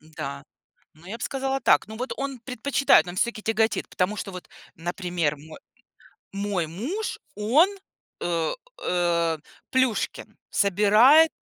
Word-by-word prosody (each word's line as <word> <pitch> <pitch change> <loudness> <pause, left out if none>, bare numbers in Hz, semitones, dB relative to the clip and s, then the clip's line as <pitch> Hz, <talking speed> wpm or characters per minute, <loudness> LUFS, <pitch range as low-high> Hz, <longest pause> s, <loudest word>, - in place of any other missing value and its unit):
Н-да, 150 -3 -7 0.5
ну 160 +3 -20
я 225 +4 -5
б - - -16
сказала 270 0 -1
так. - - +3
Ну 220 0 -8
вот 250 +2 -3
он 275 -2 -4
предпочитает, 255 -2 +3
он 175 - -6
всё-таки 225 +2 -1
тяготит. 220 0 0
Потому 185 +3 0
что 195 - -5
вот, 180 -1 -9 0.3
например, 175 -2 -2
мой 155 +2 -12 0.8
мой 195 -4 -1
муж- 265 - -4 0.2
он 245 - +4 0.5
э, 165 -2 0 0.3
э, 170 -2 +1 0.3
Плюшкин. 260 -3 0
Собирает 215 - +5
205 Hz, 130 wpm, -25 LUFS, 175-250 Hz, 0.8 s, Собирает